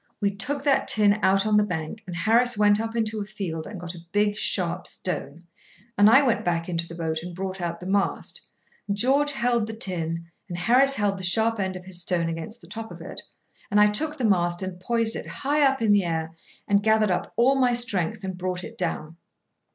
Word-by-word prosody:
We 200 Hz, -2 st, +1 dB
took 275 Hz, +8 st, -2 dB
that 280 Hz, -2 st, +2 dB
tin 210 Hz, -1 st, +3 dB
out 195 Hz, +1 st, +3 dB
on 215 Hz, -1 st, +3 dB
the 210 Hz, -, +4 dB
bank, 175 Hz, +1 st, -5 dB
and 175 Hz, -, -6 dB
Harris 230 Hz, +6 st, +2 dB
went 210 Hz, 0 st, +4 dB
up 225 Hz, 0 st, -5 dB
into 220 Hz, -2 st, 0 dB
a -, -, -2 dB
field 185 Hz, -6 st, -6 dB
and 200 Hz, -, -8 dB
got 175 Hz, 0 st, -7 dB
a 170 Hz, -2 st, -12 dB
big 205 Hz, 0 st, +1 dB
sharp 180 Hz, -3 st, 0 dB
stone, 170 Hz, -3 st, -5 dB, 0.5 s
and 205 Hz, +1 st, +6 dB
I 270 Hz, +5 st, +6 dB
went 245 Hz, -5 st, +1 dB
back 170 Hz, -1 st, -1 dB
into 170 Hz, -1 st, -2 dB
the 165 Hz, -, -9 dB
boat 160 Hz, -1 st, -3 dB
and 175 Hz, +1 st, -8 dB
brought 190 Hz, 0 st, -5 dB
out 170 Hz, -1 st, -3 dB
the 180 Hz, -, -10 dB
mast, 195 Hz, +1 st, -1 dB, 0.4 s
and 200 Hz, 0 st, -2 dB
George 280 Hz, +6 st, +3 dB
held 240 Hz, -4 st, 0 dB
the 220 Hz, -, -6 dB
tin 170 Hz, -6 st, -2 dB, 0.2 s
and 175 Hz, -, -5 dB
Harris 255 Hz, +9 st, +6 dB
held 200 Hz, -3 st, 0 dB
the -, -, -5 dB
sharp 220 Hz, +5 st, +3 dB
end 190 Hz, -1 st, -2 dB
of 180 Hz, 0 st, -9 dB
his 180 Hz, -2 st, -2 dB
stone 170 Hz, -1 st, 0 dB
against 165 Hz, +8 st, -6 dB
the -, -, -15 dB
top 225 Hz, 0 st, -7 dB
of -, -, -10 dB
it, -, -, -8 dB, 0.5 s
and 205 Hz, -, +2 dB
I 210 Hz, 0 st, +5 dB
took 305 Hz, +8 st, -2 dB
the 250 Hz, -, -1 dB
mast 175 Hz, -3 st, +1 dB
and 185 Hz, -1 st, -6 dB
poised 230 Hz, +3 st, 0 dB
it -, -, -6 dB
high 290 Hz, +2 st, -1 dB
up 270 Hz, -3 st, +2 dB
in 215 Hz, -, +3 dB
the 205 Hz, -1 st, +4 dB
air, 165 Hz, -1 st, -2 dB, 0.4 s
and 200 Hz, -1 st, +3 dB
gathered 220 Hz, -1 st, +2 dB
up 180 Hz, -, -2 dB
all 250 Hz, +3 st, +4 dB
my 255 Hz, -2 st, +2 dB
strength 215 Hz, -3 st, -1 dB
and 190 Hz, -1 st, -4 dB
brought 180 Hz, 0 st, -4 dB
it 225 Hz, +3 st, -10 dB
down. 155 Hz, +2 st, -3 dB
200 Hz, 230 wpm, -24 LUFS, 175-225 Hz, 0.5 s, and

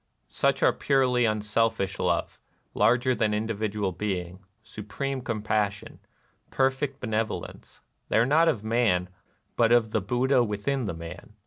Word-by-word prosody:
Such -, -, +1 dB
are -, -, +5 dB
purely 125 Hz, -3 st, +2 dB
unselfish 105 Hz, -2 st, 0 dB
love, 85 Hz, -2 st, -1 dB, 0.3 s
larger 125 Hz, +2 st, +3 dB
than 110 Hz, -3 st, 0 dB
individ 110 Hz, -1 st, -2 dB
ual 100 Hz, -4 st, -1 dB
being, 90 Hz, -2 st, -3 dB, 0.2 s
— 110 Hz, -, -45 dB
supreme 130 Hz, +6 st, -4 dB
compassion, 105 Hz, -3 st, -2 dB, 0.3 s
— -, -, -41 dB
perfect 135 Hz, +1 st, 0 dB
benevolence: 110 Hz, 0 st, -4 dB, 0.3 s
they -, -, +2 dB
are 115 Hz, -, +4 dB
not 155 Hz, +5 st, +4 dB
of 125 Hz, -10 st, 0 dB
man, 110 Hz, -6 st, +1 dB, 0.5 s
but -, -, +3 dB
of 115 Hz, -2 st, +3 dB
the 110 Hz, -, 0 dB
Buddha 125 Hz, +5 st, +2 dB
within 120 Hz, +5 st, -2 dB
the 95 Hz, -, -3 dB
man. 85 Hz, +5 st, -10 dB
110 Hz, 145 wpm, -26 LUFS, 100-125 Hz, 0.5 s, are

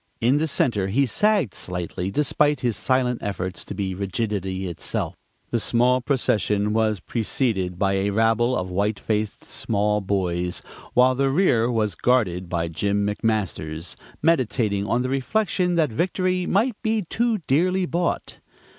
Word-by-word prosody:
In 125 Hz, +5 st, +3 dB
the 160 Hz, +2 st, +1 dB
center 115 Hz, -9 st, +1 dB
he 130 Hz, +8 st, +2 dB
sagged 200 Hz, -, +1 dB
slightly, 90 Hz, +1 st, -4 dB
despite 145 Hz, +4 st, +2 dB
his 120 Hz, -3 st, 0 dB
silent 125 Hz, +1 st, +1 dB
efforts 95 Hz, -2 st, -4 dB
to -, -, -7 dB
be 95 Hz, -1 st, -2 dB
rigidity 95 Hz, -1 st, -2 dB
itself. 85 Hz, -, -3 dB, 0.4 s
The 120 Hz, -, +1 dB
small 125 Hz, +3 st, +2 dB
procession 105 Hz, -5 st, +1 dB
was 110 Hz, -2 st, +1 dB
preceded 105 Hz, -4 st, -1 dB
by 100 Hz, +1 st, +1 dB
a 95 Hz, +1 st, +1 dB
rabble 115 Hz, +4 st, +2 dB
of 90 Hz, 0 st, -3 dB
white 100 Hz, +2 st, 0 dB
faced 105 Hz, -1 st, -2 dB
small 105 Hz, -1 st, -1 dB
boys, 90 Hz, -3 st, -1 dB, 0.3 s
while 125 Hz, +1 st, +5 dB
the 135 Hz, +1 st, +1 dB
rear 135 Hz, -7 st, +3 dB
was 110 Hz, -4 st, 0 dB
guarded 95 Hz, -8 st, +1 dB
by 85 Hz, -1 st, -1 dB
Jim 100 Hz, +5 st, 0 dB
McMasters, 95 Hz, -7 st, -2 dB, 0.3 s
meditating 120 Hz, -10 st, +1 dB
on 120 Hz, +2 st, +1 dB
the 130 Hz, -, -2 dB
reflection 180 Hz, +6 st, 0 dB
that 160 Hz, -6 st, +2 dB
victory 185 Hz, -, 0 dB
might 220 Hz, +3 st, +1 dB
be 220 Hz, -2 st, 0 dB
too 230 Hz, +2 st, +1 dB
dearly 180 Hz, +7 st, +2 dB
bought. 170 Hz, 0 st, -2 dB
115 Hz, 145 wpm, -23 LUFS, 100-135 Hz, 0.4 s, while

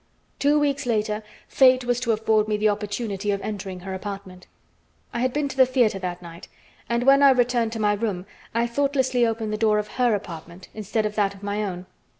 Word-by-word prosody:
Two 290 Hz, +1 st, +3 dB
weeks 280 Hz, -3 st, 0 dB
later, 215 Hz, -2 st, 0 dB, 0.3 s
fate 255 Hz, -1 st, +4 dB
was 245 Hz, 0 st, +1 dB
to 240 Hz, -2 st, 0 dB
afford 215 Hz, -1 st, +2 dB
me 210 Hz, -1 st, 0 dB
the 215 Hz, +1 st, +2 dB
opportunity 205 Hz, 0 st, -3 dB
of 200 Hz, -1 st, +1 dB
entering 190 Hz, -3 st, -5 dB
her 190 Hz, +1 st, -6 dB
apartment. 190 Hz, -1 st, -7 dB, 0.7 s
I -, -, -2 dB
had 255 Hz, +1 st, +1 dB
been 295 Hz, +2 st, -1 dB
to 265 Hz, -, -7 dB
the 260 Hz, -1 st, +5 dB
theater 245 Hz, -6 st, +2 dB
that 180 Hz, -1 st, -5 dB
night, 170 Hz, 0 st, -11 dB, 0.4 s
and 235 Hz, +1 st, 0 dB
when 275 Hz, +2 st, +6 dB
I 280 Hz, -, +8 dB
returned 245 Hz, -3 st, +2 dB
to 225 Hz, -, -4 dB
my 210 Hz, -1 st, +2 dB
room 205 Hz, -4 st, -3 dB, 0.3 s
I 230 Hz, +1 st, +1 dB
thoughtlessly 260 Hz, -1 st, +1 dB
opened 220 Hz, -1 st, -2 dB
the -, -, -1 dB
door 215 Hz, -1 st, +3 dB
of 210 Hz, 0 st, -2 dB
her 240 Hz, -3 st, +3 dB
apartment 170 Hz, -1 st, -9 dB
instead 215 Hz, +1 st, -2 dB
of 210 Hz, -, -2 dB
that 200 Hz, -1 st, +1 dB
of 200 Hz, -, -16 dB
my 205 Hz, +1 st, -2 dB
own. 180 Hz, -2 st, -5 dB
215 Hz, 210 wpm, -24 LUFS, 200-245 Hz, 0.7 s, I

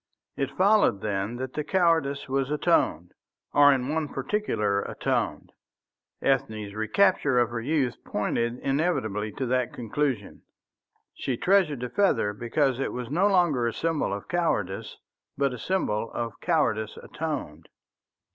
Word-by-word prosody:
It 135 Hz, -, -3 dB
followed, 200 Hz, -, +4 dB
then, 100 Hz, +2 st, -2 dB
that 130 Hz, +1 st, -5 dB
the 150 Hz, -, -2 dB
cowardice 160 Hz, -5 st, +1 dB
was 135 Hz, 0 st, 0 dB
atoned, 150 Hz, -, +1 dB, 0.4 s
or 145 Hz, 0 st, +7 dB
in 135 Hz, +1 st, 0 dB
one 160 Hz, -1 st, 0 dB
particular 105 Hz, -, 0 dB
atoned. -, -, -2 dB, 0.7 s
Ethne's 110 Hz, -6 st, 0 dB
recapture 125 Hz, -, +2 dB
of 120 Hz, -1 st, +3 dB
her 115 Hz, -1 st, -3 dB
youth 135 Hz, -1 st, -1 dB
pointed 115 Hz, +3 st, -1 dB
inevitably 110 Hz, -, 0 dB
to 130 Hz, -, -3 dB
that 125 Hz, 0 st, 0 dB
conclusion. 120 Hz, -2 st, -2 dB, 0.7 s
She 130 Hz, -3 st, -3 dB
treasured 180 Hz, -8 st, +2 dB
the 125 Hz, -, -3 dB
feather 190 Hz, -, +2 dB
because 125 Hz, +4 st, 0 dB
it 135 Hz, -, -2 dB
was 125 Hz, 0 st, -5 dB
no 180 Hz, +7 st, +3 dB
longer 170 Hz, -11 st, +3 dB
a 115 Hz, -, -2 dB
symbol 160 Hz, -3 st, -1 dB
of 100 Hz, 0 st, -5 dB
cowardice 105 Hz, -, -1 dB, 0.4 s
but 140 Hz, -2 st, +1 dB
a 125 Hz, -, -7 dB
symbol 115 Hz, -, -1 dB
of 115 Hz, -4 st, -4 dB
cowardice 115 Hz, -, 0 dB
atoned. 145 Hz, -, -5 dB
130 Hz, 135 wpm, -26 LUFS, 110-155 Hz, 0.7 s, or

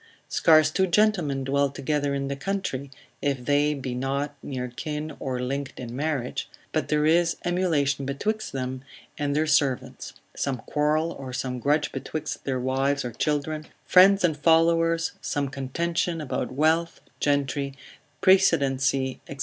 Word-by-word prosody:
Scarce 155 Hz, -2 st, +5 dB
two 190 Hz, +3 st, +2 dB
gentlemen 175 Hz, -8 st, +2 dB
dwell 140 Hz, +1 st, +1 dB
together 140 Hz, +1 st, -1 dB
in 140 Hz, 0 st, -2 dB
the 140 Hz, -, -2 dB
country, 140 Hz, -4 st, -3 dB, 0.3 s
(if 135 Hz, -3 st, -1 dB
they 145 Hz, +1 st, +2 dB
be 130 Hz, -2 st, -4 dB
not 135 Hz, +3 st, -2 dB
near 130 Hz, -3 st, -4 dB
kin 150 Hz, +4 st, -5 dB
or 130 Hz, -2 st, -3 dB
linked 135 Hz, +2 st, -4 dB
in 120 Hz, -1 st, -6 dB
marriage) 140 Hz, -3 st, -2 dB, 0.2 s
but -, -, -1 dB
there 150 Hz, 0 st, +2 dB
is 170 Hz, +1 st, +3 dB
emulation 160 Hz, -6 st, +1 dB
betwixt 210 Hz, +11 st, -2 dB
them 130 Hz, 0 st, -4 dB, 0.4 s
and 145 Hz, -1 st, 0 dB
their 155 Hz, +1 st, +2 dB
servants, 145 Hz, -4 st, 0 dB, 0.2 s
some 135 Hz, -2 st, -1 dB
quarrel 150 Hz, +6 st, 0 dB
or 130 Hz, -5 st, -7 dB
some 125 Hz, 0 st, -3 dB
grudge 145 Hz, +4 st, +1 dB
betwixt 145 Hz, +3 st, -5 dB
their 130 Hz, -2 st, -1 dB
wives 135 Hz, +2 st, 0 dB
or 120 Hz, -, -3 dB
children, 150 Hz, +4 st, -2 dB, 0.2 s
friends 195 Hz, +2 st, +6 dB
and 160 Hz, -4 st, +2 dB
followers, 165 Hz, +1 st, +3 dB
some 145 Hz, -1 st, -1 dB
contention 165 Hz, +6 st, -2 dB
about 150 Hz, -4 st, -3 dB
wealth, 160 Hz, +5 st, +1 dB, 0.2 s
gentry, 140 Hz, -1 st, 0 dB, 0.5 s
precedency, 135 Hz, -8 st, +3 dB
&c. 140 Hz, -, -7 dB
145 Hz, 145 wpm, -26 LUFS, 135-160 Hz, 0.5 s, friends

